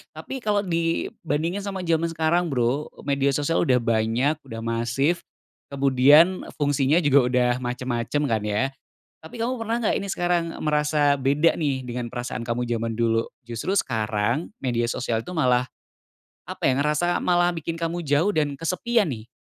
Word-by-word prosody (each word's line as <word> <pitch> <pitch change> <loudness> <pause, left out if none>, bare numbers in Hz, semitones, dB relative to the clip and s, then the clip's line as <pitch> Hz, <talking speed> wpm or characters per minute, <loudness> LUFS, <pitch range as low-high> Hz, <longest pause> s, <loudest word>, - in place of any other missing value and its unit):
tapi 265 - -6
kalau 210 -3 0
dibandingin 165 0 -1
sama 195 -2 -5
zaman 165 0 +1
sekarang 170 +2 +1
Bro 135 +1 0 0.2
media 140 -1 +1
sosial 150 +3 0
udah 125 - +4 0.2
banyak 120 +8 +1
udah 115 0 -7
masif, 120 +8 0 0.5
kemudian 140 +6 +4
fungsinya 145 +3 +2
juga 140 -1 +5
udah 125 -1 +2
macem-macem 125 +3 -2
kan 115 -6 +1
ya, 110 +7 0 0.5
tapi 225 +8 -9
kamu 250 +3 -1
pernah 225 0 -2
gak - - +1
ini 200 0 -3
sekarang 175 -1 +1 0.2
merasa 150 -1 +2
beda 140 +5 +2
nih 135 -5 -2
dengan 120 -1 -4
perasaan 120 -1 -4
kamu 120 0 -2
zaman 115 -1 -1
dulu 115 -1 +2 0.2
justru 120 - -3
sekarang 115 - -1
media 120 -2 0
sosial 115 -2 -2
tuh 180 - -7
malah, 125 -3 +3 0.8
apa - - -8
ya 130 - 0
ngerasa 150 +4 +1
malah 175 0 +2
bikin 165 0 -4
kamu 165 +1 -3
jauh 155 +9 +3
dan 150 -5 0
kesepian 185 - 0
nih? 110 -1 -7
145 Hz, 155 wpm, -24 LUFS, 125-170 Hz, 0.8 s, juga